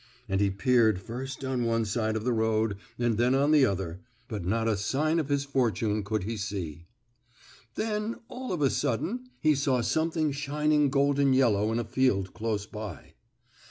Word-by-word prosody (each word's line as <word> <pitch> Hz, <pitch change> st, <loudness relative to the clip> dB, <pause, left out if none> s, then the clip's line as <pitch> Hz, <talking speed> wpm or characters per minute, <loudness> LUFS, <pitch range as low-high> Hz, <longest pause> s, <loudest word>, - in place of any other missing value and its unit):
And 95 Hz, -1 st, 0 dB
he 100 Hz, -, +3 dB
peered 110 Hz, 0 st, +3 dB
first 130 Hz, +7 st, -6 dB
on 130 Hz, -2 st, -1 dB
one 115 Hz, -1 st, +1 dB
side 110 Hz, +1 st, -1 dB
of 110 Hz, -, -2 dB
the 125 Hz, +1 st, +1 dB
road 110 Hz, -2 st, +1 dB, 0.2 s
and 120 Hz, -2 st, 0 dB
then 125 Hz, +2 st, +3 dB
on 140 Hz, +2 st, +3 dB
the 145 Hz, -4 st, +6 dB
other, 95 Hz, -3 st, -3 dB, 0.3 s
but 105 Hz, -7 st, -4 dB
not 110 Hz, +5 st, 0 dB
a 110 Hz, -, +2 dB
sign 150 Hz, -, 0 dB
of 150 Hz, -3 st, -2 dB
his 140 Hz, -1 st, +1 dB
fortune 115 Hz, -6 st, 0 dB
could 105 Hz, 0 st, -2 dB
he 110 Hz, +3 st, -3 dB
see. 85 Hz, -6 st, -5 dB, 0.9 s
Then, 215 Hz, +1 st, -2 dB
all 255 Hz, +1 st, -6 dB
of 170 Hz, -5 st, -1 dB
a 135 Hz, -, +3 dB
sudden 200 Hz, -, -2 dB
he 155 Hz, -1 st, +4 dB
saw 135 Hz, -3 st, +1 dB
something 160 Hz, +3 st, 0 dB
shining 150 Hz, +1 st, +1 dB
golden 140 Hz, 0 st, +3 dB
yellow 110 Hz, -5 st, +3 dB
in 115 Hz, -, 0 dB
a 120 Hz, -, 0 dB
field 110 Hz, -5 st, +1 dB
close 110 Hz, -2 st, -2 dB
by. 105 Hz, -6 st, -8 dB
120 Hz, 180 wpm, -28 LUFS, 105-140 Hz, 0.9 s, the